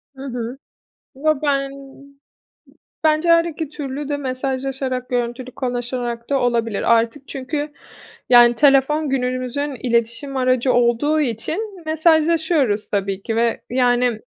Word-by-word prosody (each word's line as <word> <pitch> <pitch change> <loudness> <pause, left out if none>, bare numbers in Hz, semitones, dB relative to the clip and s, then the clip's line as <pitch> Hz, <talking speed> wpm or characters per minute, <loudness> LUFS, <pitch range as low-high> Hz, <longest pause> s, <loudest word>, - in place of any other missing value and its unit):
Hı 265 - -9
hı. 245 -1 -5 0.6
Yo, 310 +3 +1
ben 275 -2 +1 1.3
bence 310 +2 +3
her 335 0 +6
2 320 -2 -4
türlü 285 -1 -5
de 290 - -1
mesajlaşarak, 265 -1 -3
görüntülü 245 +1 -2
konuşarak 245 -2 -4
da 280 - +3
olabilir. 230 -4 0
Artık 230 +5 -1
çünkü, 290 +2 -4 0.6
yani, 240 -1 +7
telefon 285 +3 +3
günümüzün 255 +2 -2
iletişim 235 +4 -1
aracı 255 0 +2
olduğu 245 +6 +2
için 335 - -3
mesajlaşıyoruz 315 -7 +2
tabii 195 -1 -2
ki 225 - -3
ve, 230 0 +1
yani, 245 -2 +2
260 Hz, 115 wpm, -20 LUFS, 240-290 Hz, 1.3 s, yani